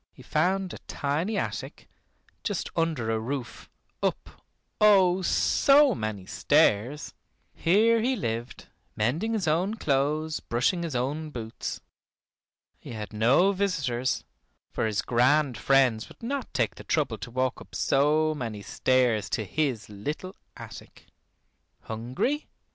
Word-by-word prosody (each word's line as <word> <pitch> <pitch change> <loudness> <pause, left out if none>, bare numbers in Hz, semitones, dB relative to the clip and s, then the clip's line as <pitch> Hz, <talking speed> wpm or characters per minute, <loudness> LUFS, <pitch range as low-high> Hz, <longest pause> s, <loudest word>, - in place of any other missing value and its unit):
He - - -16
found 185 +4 0
a - - -8
tiny 160 +9 -1
attic, - - -4 0.6
just 205 -5 -3
under 160 -9 0
a 110 - 0
roof, 125 +2 -5 0.3
up, - - -3 0.4
oh! 190 -3 +5
so 275 +8 +4
many 110 - -4
stairs. 120 +10 +2 0.4
Here 220 +6 +3
he 255 +3 +1
lived, 115 - -4 0.3
mending 155 - 0
his 200 -6 -1
own 180 +7 +1
clothes, 150 -1 0
brushing 125 +10 0
his 165 -5 -4
own 145 +6 -2
boots. 115 -5 -6 1.0
He - - -9
had 110 -1 -6
no 125 - +4
visitors, 140 -11 -1 0.5
for - - -1
his 105 -2 -1
grand 130 +3 +3
friends 125 -1 +2
would - - -17
not 270 +2 -3
take 120 -6 0
the - - -11
trouble - - 0
to - - -7
walk 130 +1 -1
up - - -13
so 155 +3 +2
many 115 -8 -5
stairs 125 -5 +1
to 110 - -1
his 130 -1 -1
little 150 - -6 0.2
attic. - - -11 0.8
Hungry? 125 - -2
145 Hz, 130 wpm, -27 LUFS, 120-185 Hz, 1.0 s, oh